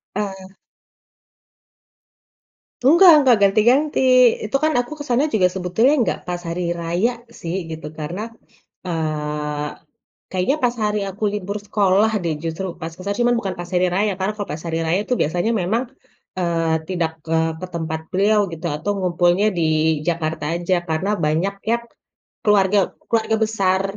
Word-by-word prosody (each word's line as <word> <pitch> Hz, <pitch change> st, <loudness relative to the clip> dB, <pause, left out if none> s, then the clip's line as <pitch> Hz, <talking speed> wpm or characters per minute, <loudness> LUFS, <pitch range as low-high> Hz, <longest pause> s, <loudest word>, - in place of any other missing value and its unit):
Eee. 195 Hz, -2 st, -5 dB, 2.3 s
Enggak 335 Hz, +8 st, +7 dB
enggak, 255 Hz, -4 st, +5 dB
ganti-ganti. 235 Hz, +9 st, +3 dB, 0.5 s
Itu 215 Hz, +6 st, 0 dB
kan 310 Hz, 0 st, +3 dB
aku 245 Hz, +3 st, -3 dB
kesananya 285 Hz, +1 st, 0 dB
juga 185 Hz, -4 st, +4 dB
sebetulnya 190 Hz, +9 st, +2 dB, 0.2 s
gak -, -, -3 dB
pas 175 Hz, 0 st, -3 dB
hari 170 Hz, 0 st, -2 dB
raya 175 Hz, +7 st, 0 dB, 0.2 s
sih 175 Hz, -7 st, -6 dB
gitu, 160 Hz, -2 st, -6 dB
karena, 175 Hz, +9 st, -5 dB, 0.6 s
eee, 150 Hz, -2 st, -2 dB, 0.6 s
kayaknya 185 Hz, +10 st, +1 dB
pas 245 Hz, 0 st, +2 dB
hari 210 Hz, 0 st, 0 dB
aku 200 Hz, +3 st, -5 dB
libur 205 Hz, 0 st, -4 dB
sekolah 205 Hz, +1 st, +3 dB
deh 165 Hz, -2 st, -1 dB
justru, 165 Hz, +4 st, -3 dB
pas 165 Hz, 0 st, -4 dB
ke -, -, -15 dB
sana. 200 Hz, 0 st, -2 dB
Cuma 240 Hz, 0 st, +3 dB
bukan 195 Hz, -5 st, -3 dB
pas 175 Hz, -, -5 dB
hari 180 Hz, +1 st, +3 dB
raya, 205 Hz, +3 st, +2 dB
karena 190 Hz, +2 st, -1 dB
kalo 205 Hz, -, -4 dB
pas 155 Hz, +1 st, -6 dB
hari 165 Hz, -1 st, -1 dB
raya 170 Hz, +3 st, +2 dB
itu 250 Hz, -, +1 dB
biasanya 175 Hz, +8 st, 0 dB
memang, 220 Hz, +7 st, 0 dB, 0.6 s
eee, 165 Hz, -2 st, 0 dB
tidak 170 Hz, -3 st, -1 dB
ke 165 Hz, -, -2 dB, 0.3 s
ke -, -, -3 dB
tempat 160 Hz, -1 st, -3 dB
beliau 210 Hz, +3 st, +3 dB
gitu 165 Hz, +1 st, -6 dB
atau 160 Hz, +7 st, -3 dB
ngumpulnya 180 Hz, +1 st, +2 dB
di 160 Hz, -1 st, +2 dB
Jakarta 160 Hz, -2 st, -2 dB
aja, 175 Hz, +2 st, 0 dB
karena 160 Hz, +5 st, -1 dB
banyak 165 Hz, +6 st, 0 dB, 0.2 s
yang 235 Hz, 0 st, +1 dB, 0.6 s
keluarga 205 Hz, -1 st, +4 dB, 0.3 s
keluarga 225 Hz, -1 st, +1 dB
besar 195 Hz, -3 st, +1 dB
185 Hz, 150 wpm, -21 LUFS, 165-210 Hz, 2.3 s, Enggak